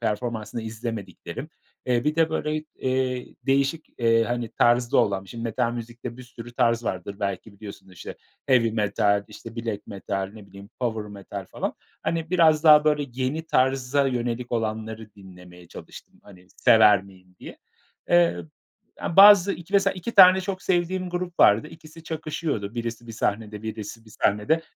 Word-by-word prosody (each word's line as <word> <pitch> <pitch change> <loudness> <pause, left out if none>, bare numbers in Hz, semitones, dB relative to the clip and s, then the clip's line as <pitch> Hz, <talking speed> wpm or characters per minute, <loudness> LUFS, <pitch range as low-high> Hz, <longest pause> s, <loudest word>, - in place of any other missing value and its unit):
performansını 115 0 -3
izlemediklerim. 110 -5 -6 0.4
Eee, 120 0 +1
bir 150 +1 +1
de 160 -1 +2
böyle, 155 -1 -2
eee, 130 -1 -1 0.2
değişik, 140 +3 0
eee, 115 -1 +3
hani, 120 -1 -3
tarzda 120 +2 +2
olan 100 -1 +1
şimdi 115 +4 -8
metal 115 +1 -1
müzikte 120 +1 -7
bir 130 - -10
sürü 120 -1 -11
tarz 115 0 +1
vardır, 100 0 -4
belki 100 +1 -4
biliyorsundur, 100 -2 -12
işte 90 - -9 0.3
heavy 125 -4 +3
metal, 105 -1 +1
işte 115 +2 -11
black 115 -3 -4
metal, 95 -1 -4
ne 105 -2 -12
bileyim, 100 0 -13
power 115 -3 -1
metal 100 -1 -9
falan. - - -4 0.3
Hani, 165 -1 -2
biraz 160 -3 +4
daha, 150 -1 +8
böyle, 150 -2 +1
yeni 135 +5 -2
tarza 135 0 +1
yönelik 120 -1 -3
olanları 110 -1 -4
dinlemeye 90 -2 -15
çalıştım, - - -12
"Hani, 90 -3 -17
sever 105 -3 +5
miyim?" 90 -1 -19
diye. - - -10 0.5
Eee, 85 0 +4 0.7
ya, 170 - -3
bazı 200 -1 +8
iki 175 +2 -10
mesela 195 -1 +3
2 190 +6 -6
tane 185 -1 +8
çok 190 0 -5
sevdiğim 180 0 -1
grup 175 0 -4
vardı. 110 +8 +5
İkisi 160 0 -14
çakışıyordu. 155 -9 -4
Birisi 115 0 -5
bir 115 - -8
sahnede, 105 -1 -3
birisi 110 +1 -7
bir 110 - -17
sahnede. 105 +10 +1
115 Hz, 155 wpm, -24 LUFS, 105-150 Hz, 0.7 s, daha